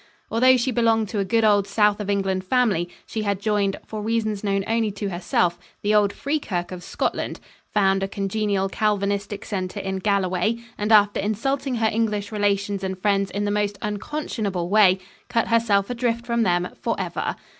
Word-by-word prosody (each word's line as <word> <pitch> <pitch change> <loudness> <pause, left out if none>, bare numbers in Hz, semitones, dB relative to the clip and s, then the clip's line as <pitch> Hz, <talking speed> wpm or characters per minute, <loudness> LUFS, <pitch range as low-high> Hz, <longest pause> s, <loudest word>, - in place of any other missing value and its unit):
Although 255 +3 +5
she 250 +2 0
belonged 225 -2 +2
to 210 - -2
a - - +2
good 225 +4 +1
old 205 -2 +4
South 210 +1 +2
of 205 -1 -4
England 195 -2 0
family, 200 -6 +1 0.2
she 220 - -4
had 200 -2 -1
joined, 205 -2 0
for 215 -1 -6
reasons 215 -2 -1
known 195 -1 0
only 225 -1 +1
to 200 0 -3
herself, 175 0 0 0.2
the 210 +1 +2
old 205 -1 +4
Free 285 +6 -2
Kirk 175 -9 -3
of 180 -1 -7
Scotland, - - -2 0.3
found 195 -2 +2
a 195 - 0
congenial 195 0 -1
Calvinistic 200 0 -1
centre 190 0 -3
in 190 -1 -3
Galloway, 195 +2 +1 0.2
and 210 +1 -2
after 205 -1 +5
insulting 255 +6 -1
her 225 -1 +2
English 210 -2 -1
relations 200 -1 0
and 190 0 -3
friends 195 0 +1
in 205 +2 -2
the 205 - 0
most 205 -1 0
unconscionable 210 - -3
way, 195 -2 +5 0.3
cut 235 -2 +1
herself 220 -4 +3
adrift 235 -1 -1
from 235 -1 0
them 180 -3 +1
for - - -1
ever. - - -2
205 Hz, 180 wpm, -23 LUFS, 195-225 Hz, 0.3 s, Although